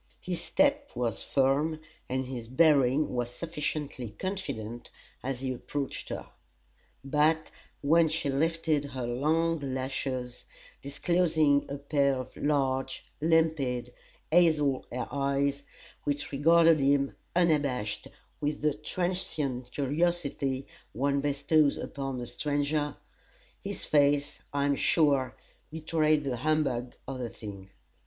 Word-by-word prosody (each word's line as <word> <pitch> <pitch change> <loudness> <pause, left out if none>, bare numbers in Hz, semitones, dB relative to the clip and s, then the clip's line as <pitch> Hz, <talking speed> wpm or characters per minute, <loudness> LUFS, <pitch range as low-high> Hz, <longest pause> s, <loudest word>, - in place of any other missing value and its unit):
His 180 -2 -4
step 285 - +2
was 115 -5 -1
firm 145 +4 +1 0.3
and 130 +1 -1
his 125 -3 -6
bearing 140 0 +4
was 120 -1 -1
sufficiently 150 -3 -4
confident 135 - -4 0.3
as 130 -1 -3
he 130 -1 -1
approached 140 +3 -4
her; - - -5 0.8
but 155 +3 +2 0.3
when 160 +3 +5
she 155 -1 -1
lifted 160 +1 +1
her 130 -3 -4
long 160 +7 +1
lashes, 130 -2 -3 0.4
disclosing 150 -1 +2
a 140 - -3
pair 140 -1 +1
of 130 -1 -6
large, 135 -2 0 0.2
limpid, 150 -7 +1 0.4
hazel 155 -5 +3
eyes, 140 +2 -1 0.4
which 145 0 -2
regarded 165 +3 +5
him, 140 0 +2 0.2
unabashed, 140 -11 +1 0.3
with 150 0 -2
the 150 -1 +3
transient 150 -5 -2
curiosity 140 -2 -1 0.3
one 140 +4 +1
bestows 145 +1 +2
upon 135 -2 -4
a - - -4
stranger, 145 +3 -1 0.7
his 200 0 -3
face, 145 -1 +2
I 140 0 0
am 140 0 +2
sure, 140 -5 +2 0.3
betrayed 155 -1 +1
the 130 -3 -2
humbug 135 -3 0
of 135 -1 -5
the 120 -2 -3
thing. 100 -4 -9
140 Hz, 115 wpm, -29 LUFS, 130-155 Hz, 0.8 s, when